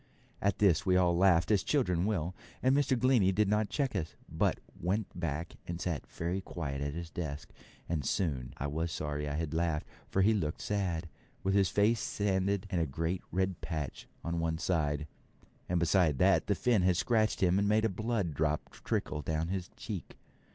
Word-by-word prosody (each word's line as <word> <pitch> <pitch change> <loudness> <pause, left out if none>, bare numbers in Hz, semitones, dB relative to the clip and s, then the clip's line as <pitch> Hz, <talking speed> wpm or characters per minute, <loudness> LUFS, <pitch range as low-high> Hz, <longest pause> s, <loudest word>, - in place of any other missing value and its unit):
At 100 -1 +1
this 95 -6 +4
we 90 -1 +3
all 90 -2 +4
laughed, 90 0 +4
as 100 -3 +4
children 95 - +1
will, 90 -5 -1 0.3
and 130 +1 +4
Mr. 140 -2 +2
Glennie 120 -6 +4
did 105 +2 +2
not 105 +1 +1
check 140 -6 -1
us, 80 -5 -2
but - - 0 0.2
went 95 +5 0
back 85 -1 -3
and 85 0 -4
sat 85 -5 -3
very 85 +4 -3
quiet 70 -7 -4
at 70 +1 -2
his 85 -1 -6
desk; 75 -3 -5 0.4
and 80 -4 -1
soon 65 -7 -1
I 70 - -3
was 80 +3 -2
sorry 75 -1 -3
I 70 - -2
had 80 0 -2
laughed, 80 -2 0 0.2
for 95 - +2
he 110 +3 +5
looked 80 -8 -1
sad, 90 -5 -1 0.4
with 95 - +1
his 100 -3 +4
face 105 +5 +3
sanded 100 -1 0
and 90 -3 +1
a 80 - +1
great 80 +6 -2
red 95 -1 0
patch 75 -5 -4 0.2
on 85 0 -2
one 80 -1 0
side, 75 -4 0 0.6
and 90 0 +2
beside 85 -4 +3
that - - +4
the - - +2
fin 120 -5 +2
had 90 -1 +3
scratched 110 -1 +2
him 90 +1 +4
and 100 0 +2
made 110 +1 +3
a - - +5
blood 105 -4 -1
drop 75 +1 -1
trickle 75 - -2
down 80 +2 -1
his 95 -1 -3
cheek. 100 -6 -6
90 Hz, 195 wpm, -32 LUFS, 80-100 Hz, 0.6 s, he